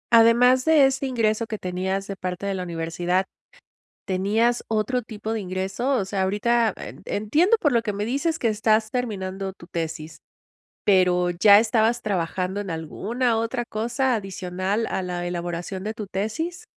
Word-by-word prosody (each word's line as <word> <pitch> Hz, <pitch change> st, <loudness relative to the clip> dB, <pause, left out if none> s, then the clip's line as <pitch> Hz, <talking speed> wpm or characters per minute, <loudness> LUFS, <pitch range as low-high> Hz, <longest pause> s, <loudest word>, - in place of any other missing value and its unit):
Además 240 Hz, +3 st, +6 dB
de 310 Hz, -2 st, +6 dB
ese 270 Hz, 0 st, 0 dB
ingreso 230 Hz, -3 st, 0 dB
que 215 Hz, -, -4 dB
tenías 190 Hz, +1 st, -2 dB
de 200 Hz, -, -5 dB
parte 185 Hz, +1 st, -5 dB
de 200 Hz, -, -1 dB
la 185 Hz, -, -3 dB
universidad, 175 Hz, +2 st, -1 dB, 0.8 s
¿tenías 215 Hz, +6 st, +1 dB
otro 225 Hz, +3 st, 0 dB
tipo 215 Hz, -1 st, -6 dB
de 225 Hz, -, -1 dB
ingreso? 190 Hz, +6 st, -2 dB
O 235 Hz, -, +1 dB
sea, 190 Hz, 0 st, -2 dB
ahorita 225 Hz, +4 st, +2 dB
e -, -, -9 dB
entiendo 305 Hz, -, +2 dB
por 295 Hz, -9 st, +1 dB
lo 235 Hz, -2 st, +3 dB
que 210 Hz, -3 st, -3 dB
me 205 Hz, -, -3 dB
dices 280 Hz, +8 st, -1 dB
que 230 Hz, -, +1 dB
estás 215 Hz, 0 st, +1 dB
terminando 195 Hz, -6 st, -3 dB
tu 170 Hz, -2 st, -15 dB
tesis, 160 Hz, -1 st, -5 dB, 0.7 s
pero 180 Hz, -2 st, +3 dB
¿ya 200 Hz, +4 st, +7 dB
estabas 225 Hz, +1 st, +1 dB
trabajando 185 Hz, 0 st, -2 dB
en 200 Hz, -, -6 dB
alguna 225 Hz, +9 st, -1 dB
otra 235 Hz, +2 st, -2 dB
cosa 240 Hz, +4 st, -1 dB
adicional 190 Hz, +1 st, -2 dB
a -, -, -2 dB
la 180 Hz, -1 st, -3 dB
elaboración 175 Hz, +2 st, -4 dB
de 215 Hz, +2 st, -4 dB
tu 210 Hz, -2 st, -6 dB
tesis? 320 Hz, -, -3 dB
210 Hz, 165 wpm, -24 LUFS, 185-235 Hz, 0.8 s, ya